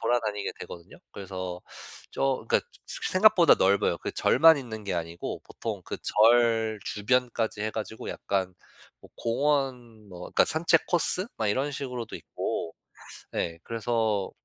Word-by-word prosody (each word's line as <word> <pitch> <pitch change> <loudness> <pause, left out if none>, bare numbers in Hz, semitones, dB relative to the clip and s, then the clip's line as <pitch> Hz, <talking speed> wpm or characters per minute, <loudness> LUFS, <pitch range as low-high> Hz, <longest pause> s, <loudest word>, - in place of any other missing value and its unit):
돌아다니게 110 -3 -1
되거든요. 85 -1 -10 0.2
그래서 95 -2 -6 0.5
저 135 -4 -1
그니까 - - +2 0.2
새 - - -4
생각보다 185 -2 +6
넓어요. 100 +1 +2
그 - - -4
절만 160 -1 +6
있는 110 -5 -7
게 100 - -2
아니고 85 0 -4
보통 - - -6
그 - - -5
절 115 -1 +3
주변까지 115 0 0
해 110 - -1
가지고 110 0 -6
약간 95 -2 -2 0.5
뭐 - - -17
공원 125 -4 -1
뭐 90 -2 -11
그러니까 - - +2
산책 165 0 +2
코스 180 +2 +2
막 110 -2 0
이런 135 +7 0
식으로도 125 -4 -5
있고 80 - -4 0.6
예 85 0 -2
그래서 110 -3 -1
115 Hz, 300 characters per minute, -27 LUFS, 100-130 Hz, 0.6 s, 생각보다